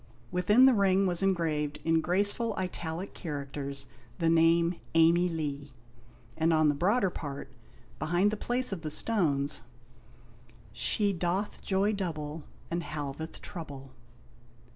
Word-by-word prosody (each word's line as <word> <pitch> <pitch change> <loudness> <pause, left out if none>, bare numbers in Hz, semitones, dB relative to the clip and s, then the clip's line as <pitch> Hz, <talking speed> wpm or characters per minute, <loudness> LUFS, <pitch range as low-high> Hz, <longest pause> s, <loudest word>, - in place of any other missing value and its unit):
Within 210 +8 +5
the 265 - +7
ring 195 -2 +3
was 175 -1 0
engraved, 160 -6 0
in 165 0 +3
graceful 205 +6 +1
italic 180 -1 -4
characters, 140 -3 -5 0.3
the 165 - +2
name 165 +1 +4 0.2
Amey 170 +2 +5
Lee, 145 -4 -4 0.6
and 160 +1 +2
on 155 -1 +4
the - - +3
broader 190 - +2
part, 140 -4 -6 0.5
behind 175 +7 +2
the - - -1
place 245 +3 -2
of 190 -4 -4
the 155 - -4
stones 150 -7 +1 1.1
She 205 - +1
doth 180 +3 -2
joy 200 +2 +1
double, 155 -5 -4 0.3
And 170 +1 0
halveth 150 0 -5
trouble. 140 -6 -8
170 Hz, 125 wpm, -30 LUFS, 150-195 Hz, 1.1 s, the